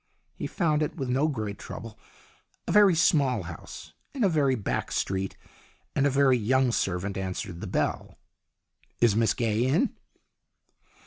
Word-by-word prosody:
He -, -, -5 dB
found 155 Hz, -5 st, 0 dB
it 150 Hz, -, -1 dB
with 135 Hz, -5 st, -4 dB
no 135 Hz, +5 st, +2 dB
great 110 Hz, -8 st, -4 dB
trouble 115 Hz, -1 st, -9 dB, 0.7 s
a -, -, -1 dB
very 205 Hz, -4 st, +6 dB
small 140 Hz, -, +3 dB
house 80 Hz, -1 st, -10 dB, 0.2 s
in 260 Hz, -, 0 dB
a 200 Hz, -, +4 dB
very 145 Hz, -5 st, +2 dB
back 105 Hz, -, -3 dB
street 95 Hz, 0 st, -2 dB, 0.6 s
and 140 Hz, 0 st, +3 dB
a -, -, +3 dB
very 135 Hz, -2 st, +3 dB
young 130 Hz, +3 st, +2 dB
servant 95 Hz, -2 st, -1 dB
answered 95 Hz, -1 st, -4 dB
the -, -, -5 dB
bell. -, -, -2 dB, 0.8 s
"Is 115 Hz, -4 st, +4 dB
Miss 110 Hz, -2 st, +2 dB
Gaye 115 Hz, -1 st, 0 dB
in?" 150 Hz, -, +2 dB
125 Hz, 150 wpm, -27 LUFS, 100-145 Hz, 0.8 s, very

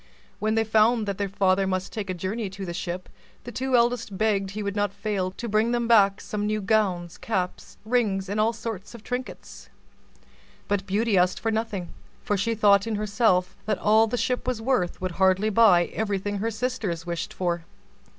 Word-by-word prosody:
When 215 Hz, +1 st, 0 dB
they 225 Hz, -, +3 dB
found 220 Hz, +1 st, +3 dB
that 200 Hz, -1 st, -3 dB
their 200 Hz, -1 st, -1 dB
father 195 Hz, -1 st, +2 dB
must 185 Hz, 0 st, -2 dB
take 210 Hz, -4 st, -4 dB
a 185 Hz, -, -2 dB
journey 195 Hz, +4 st, -3 dB
to 195 Hz, +1 st, -7 dB
the 175 Hz, -, -5 dB
ship, 175 Hz, +1 st, -4 dB, 0.4 s
the 240 Hz, -, -7 dB
two 260 Hz, +1 st, 0 dB
eldest 235 Hz, -4 st, +1 dB
begged 200 Hz, -2 st, +1 dB
he 210 Hz, +2 st, -5 dB
would 200 Hz, 0 st, -3 dB
not 205 Hz, -2 st, 0 dB
fail 200 Hz, -2 st, -2 dB
to 235 Hz, -, -6 dB
bring 220 Hz, +2 st, +2 dB
them 240 Hz, -1 st, 0 dB
back 200 Hz, -4 st, +5 dB
some 210 Hz, 0 st, -3 dB
new 215 Hz, 0 st, 0 dB
gowns, 190 Hz, -5 st, 0 dB
caps, 185 Hz, -5 st, -3 dB
rings, 215 Hz, -5 st, +1 dB
and 205 Hz, +2 st, -2 dB
all 220 Hz, +2 st, +3 dB
sorts 225 Hz, -2 st, -6 dB
of 225 Hz, -, -12 dB
trinkets. 250 Hz, +2 st, -6 dB, 1.0 s
But 200 Hz, -1 st, -1 dB
Beauty 205 Hz, 0 st, +2 dB
asked 180 Hz, +1 st, +2 dB
for 225 Hz, -, -1 dB
nothing; 220 Hz, -5 st, -2 dB, 0.3 s
for 205 Hz, -, 0 dB
she 230 Hz, +4 st, 0 dB
thought 200 Hz, -1 st, +4 dB
in 225 Hz, -, -1 dB
herself 205 Hz, -3 st, +1 dB
that 210 Hz, -2 st, +1 dB
all 220 Hz, +2 st, +4 dB
the 245 Hz, -, -2 dB
Ship 250 Hz, +1 st, -1 dB
was 250 Hz, -3 st, -1 dB
worth 225 Hz, -7 st, 0 dB
would 185 Hz, 0 st, -3 dB
hardly 190 Hz, +3 st, +3 dB
buy 195 Hz, -5 st, +6 dB
everything 205 Hz, -1 st, -2 dB
her 225 Hz, +3 st, 0 dB
sisters 215 Hz, -7 st, -3 dB
wished 170 Hz, -1 st, -4 dB
for. 175 Hz, -2 st, -2 dB
205 Hz, 195 wpm, -25 LUFS, 190-225 Hz, 1.0 s, buy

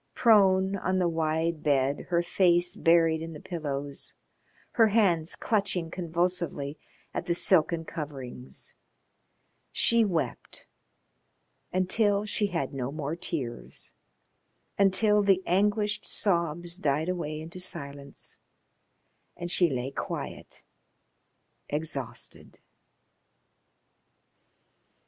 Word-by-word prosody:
Prone 195 Hz, -4 st, +5 dB
on 185 Hz, -1 st, 0 dB
the 180 Hz, -1 st, +2 dB
wide 160 Hz, 0 st, 0 dB
bed, 140 Hz, -1 st, +1 dB
her 175 Hz, -1 st, +2 dB
face 175 Hz, 0 st, +3 dB
buried 165 Hz, -4 st, +4 dB
in 165 Hz, 0 st, -6 dB
the 150 Hz, -, -8 dB
pillows, 145 Hz, -5 st, -4 dB, 0.6 s
her 225 Hz, -2 st, +5 dB
hands 185 Hz, -7 st, +2 dB
clutching 190 Hz, -6 st, 0 dB
convulsively 170 Hz, -4 st, -2 dB, 0.3 s
at 175 Hz, -, -3 dB
the 170 Hz, -, +2 dB
silken 170 Hz, -2 st, +2 dB
coverings, 135 Hz, -6 st, -7 dB, 1.0 s
she 235 Hz, -1 st, +4 dB
wept 175 Hz, -7 st, -2 dB, 1.1 s
until 200 Hz, +3 st, +2 dB
she 205 Hz, 0 st, +1 dB
had 170 Hz, -9 st, -2 dB
no 130 Hz, -1 st, -3 dB
more 150 Hz, +1 st, -3 dB
tears, 135 Hz, -9 st, -5 dB, 0.8 s
until 205 Hz, +2 st, +4 dB
the 195 Hz, -2 st, +3 dB
anguished, 205 Hz, +3 st, +1 dB
sobs 170 Hz, -3 st, 0 dB
died 150 Hz, -1 st, 0 dB
away 170 Hz, -4 st, -2 dB
into 165 Hz, +3 st, -7 dB
silence 140 Hz, -6 st, -5 dB, 1.0 s
and 175 Hz, 0 st, -4 dB
she 180 Hz, -1 st, +4 dB
lay 130 Hz, 0 st, -2 dB
quiet, -, -, -6 dB, 1.1 s
exhausted. 145 Hz, -4 st, -4 dB
170 Hz, 95 wpm, -28 LUFS, 150-190 Hz, 1.1 s, Prone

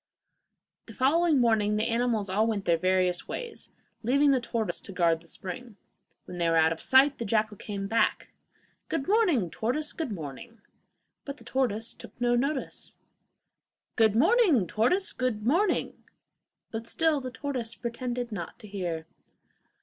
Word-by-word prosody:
The 225 Hz, -, -11 dB
following 315 Hz, +4 st, +3 dB
morning 220 Hz, -3 st, +3 dB
the 215 Hz, +1 st, +1 dB
animals 230 Hz, -3 st, 0 dB
all 210 Hz, +4 st, +1 dB
went 210 Hz, -4 st, -2 dB
their 170 Hz, -, +4 dB
various 185 Hz, -1 st, +1 dB
ways, 480 Hz, -2 st, -7 dB, 0.3 s
leaving 280 Hz, +5 st, +3 dB
the 260 Hz, -2 st, +2 dB
tortoise 230 Hz, -2 st, -2 dB
to -, -, -10 dB
guard 170 Hz, -3 st, +2 dB
the 170 Hz, -, -19 dB
spring. 215 Hz, +7 st, -7 dB, 0.5 s
When 180 Hz, -1 st, -8 dB
they 170 Hz, -1 st, +2 dB
were 165 Hz, -, +2 dB
out 160 Hz, 0 st, +4 dB
of 165 Hz, -, -10 dB
sight 270 Hz, +2 st, +5 dB
the -, -, -2 dB
jackal 215 Hz, 0 st, 0 dB
came 200 Hz, 0 st, -5 dB
back. 225 Hz, +3 st, 0 dB, 0.6 s
'Good 275 Hz, -4 st, -2 dB
morning, 355 Hz, -, +2 dB
tortoise; 290 Hz, +7 st, -2 dB
good 320 Hz, -8 st, -4 dB
morning.' 175 Hz, -, -8 dB, 0.6 s
But 280 Hz, 0 st, -7 dB
the -, -, -15 dB
tortoise 230 Hz, -4 st, -1 dB
took -, -, -14 dB
no 240 Hz, 0 st, +2 dB
notice. 275 Hz, +3 st, -2 dB, 1.0 s
'Good 220 Hz, -2 st, +4 dB
morning, 330 Hz, -, +4 dB
tortoise; 360 Hz, -, +1 dB
good 245 Hz, -5 st, -2 dB
morning.' 345 Hz, -, +1 dB, 0.7 s
But 225 Hz, 0 st, -5 dB
still 320 Hz, -1 st, +1 dB
the 255 Hz, -, -5 dB
tortoise 250 Hz, -4 st, -4 dB
pretended 245 Hz, 0 st, -4 dB
not 175 Hz, -6 st, -6 dB
to 215 Hz, -, -12 dB
hear. 175 Hz, -5 st, -4 dB
230 Hz, 155 wpm, -28 LUFS, 200-270 Hz, 1.0 s, sight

